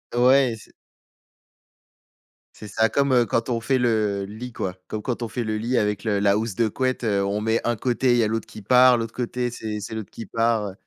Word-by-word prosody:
Ouais 130 +1 +5
et - - -4
c'est - - -16 1.8
c'est 105 - -10
ça 110 +2 +1
comme, 140 -1 +1
heu, 120 -2 +4
quand 115 +3 -1
on 120 -2 0
fait 130 +3 +1
le 110 -5 0
lit 110 +5 -8
quoi. 95 -5 -4
Comme 110 - -4
quand 120 +1 -3
on 115 - -2
fait 120 +2 -3
le 110 -1 -2
lit 120 +4 -1
avec 105 -1 0
le 105 -2 0
la 100 0 +3
housse 110 -2 -3
de 115 +1 +2
couette, 130 +3 -2
heu, 100 -3 +1
on 100 +2 -1
met 110 +1 +1
un 120 - 0
côté, 125 +3 +1
il 120 - +3
y 115 - +3
a - - +2
l'autre 115 0 -3
qui 110 - -11
part. 125 +4 +5
L'autre 115 -1 -4
côté, 125 0 -2
c'est 110 -2 -5
c'est 105 +2 -7
l'autre 110 -2 -6
qui 115 - -8
part, 115 0 0
heu. - - -10
115 Hz, 245 wpm, -23 LUFS, 105-125 Hz, 1.8 s, Ouais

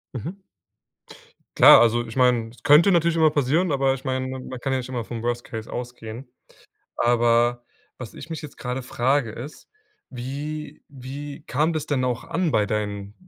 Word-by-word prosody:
Mhm. 155 - -5 1.2
Klar, - - +9
also 120 0 +3
ich 115 +2 -9
meine, 125 -3 +3
es 120 - -19
könnte 150 +7 +6
natürlich 170 -1 +2
immer 160 -1 +5
passieren, 150 +5 +1
aber 135 -1 +2
ich 135 0 -7
meine, 130 -1 -2
man 130 -1 -7
kann 135 +1 -2
ja - - +1
nicht 125 - -7
immer 120 -3 -4
vom 115 -1 -6
Worst-Case 120 -2 -4
ausgehen. 120 0 -7 0.7
Aber 120 0 +2 0.3
was 115 -6 -9
ich - - -10
mich 160 -2 -6
jetzt 150 - -10
gerade 125 +1 -4
frage 125 0 0
ist, 125 +7 -9 0.4
wie 145 +5 -6
wie 140 +2 -8
kam 155 +5 +1
das 155 -2 -3
denn 135 -4 0
auch 125 -2 -2
an 170 -1 -1
bei 105 -7 +2
deinen, 105 -1 -3
130 Hz, 170 wpm, -23 LUFS, 120-145 Hz, 1.2 s, Klar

